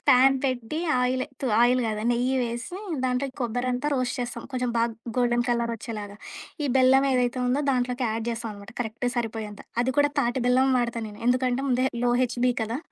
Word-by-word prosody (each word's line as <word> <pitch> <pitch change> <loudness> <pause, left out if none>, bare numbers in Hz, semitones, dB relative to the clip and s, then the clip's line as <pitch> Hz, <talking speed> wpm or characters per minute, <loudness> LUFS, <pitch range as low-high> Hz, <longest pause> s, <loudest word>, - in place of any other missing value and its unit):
Pan 270 0 +6
పెట్టి 255 +2 -2 0.2
oil 255 +1 +1 0.2
తు 270 - -1
oil 250 +1 +4
కాదు, 215 -1 -2
నెయ్యి 250 +2 +1
వేసి, 240 +8 -4 0.3
దాంట్లో 250 +2 0
ఈ - - -30
కొబ్బరంతా 245 +3 -1
రోస్ట్ 255 -2 -1
చేస్తాం. 240 -1 -4
కొంచెం 250 -1 -1
బాగ 230 0 +3 0.3
గోల్డెన్ 240 -1 +2
కలర్ 235 -1 +1
వచ్చేలాగా. 205 -2 -7 0.5
ఈ - - 0
బెల్లం 265 +1 +5
ఏదైతే 250 0 +1
ఉందో 265 +4 +1
దాంట్లోకి 250 0 0
యాడ్ 225 0 -2
చేస్తామనమాట. 215 -3 -6
కరెక్ట్ 230 +1 -3
సరిపోయేంత. 220 -3 -3 0.2
అది 260 +1 0
కూడా 290 0 +4
తాటి 240 +1 0
బెల్లం 260 +2 +4
వాడతా 240 -1 -1
నేను. 210 0 -11
ఎందుకంటే 255 +1 +2
ముందే 255 0 +2 0.2
లో 245 - +3
హెచ్‌బి 245 +1 +1
కదా! 230 +3 -2
245 Hz, 175 wpm, -26 LUFS, 235-255 Hz, 0.5 s, Pan